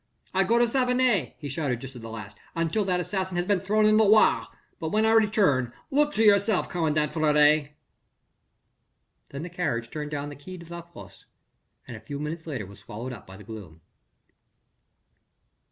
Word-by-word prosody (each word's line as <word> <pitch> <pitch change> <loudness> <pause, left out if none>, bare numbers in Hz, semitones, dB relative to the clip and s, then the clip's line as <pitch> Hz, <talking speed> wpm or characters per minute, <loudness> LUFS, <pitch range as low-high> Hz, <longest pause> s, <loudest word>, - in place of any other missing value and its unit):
"I 190 +1 +3
go 230 +4 +3
to 240 - +5
Savenay," 250 - +1
he 145 - -7
shouted 140 -4 -2
just 135 +1 -9
at 120 - -9
the 115 - -8
last, 105 -2 -8 0.2
"until 165 +6 0
that 180 -1 +1
assassin 190 0 -2
has 175 - 0
been 200 -1 +2
thrown 210 +3 +2
in 215 0 +5
the 220 - +6
Loire. 215 +1 +4 0.3
But 160 -3 -3
when 215 +1 +2
I 220 - +4
return... 200 - +3 0.2
look 295 +1 +2
to 225 - +3
yourself 200 -1 +4
commandant 155 -3 0
Fleury." 150 -1 +3 1.5
Then 140 +3 -6
the 175 - -6
carriage 130 -10 -2
turned 150 -1 -5
down 145 -1 -4
the 145 - -9
Quai 180 +7 -10
de 170 - -11
la 170 - -6
Fosse 170 0 -14 0.6
and - - -7
a - - -8
few 140 - -7
minutes 160 +2 -5
later 130 -9 -4
was 100 +1 -13
swallowed 120 +5 -7
up 105 - -12
by 95 +1 -11
the 105 - -12
gloom. 95 -7 -10
160 Hz, 185 wpm, -26 LUFS, 135-205 Hz, 1.5 s, the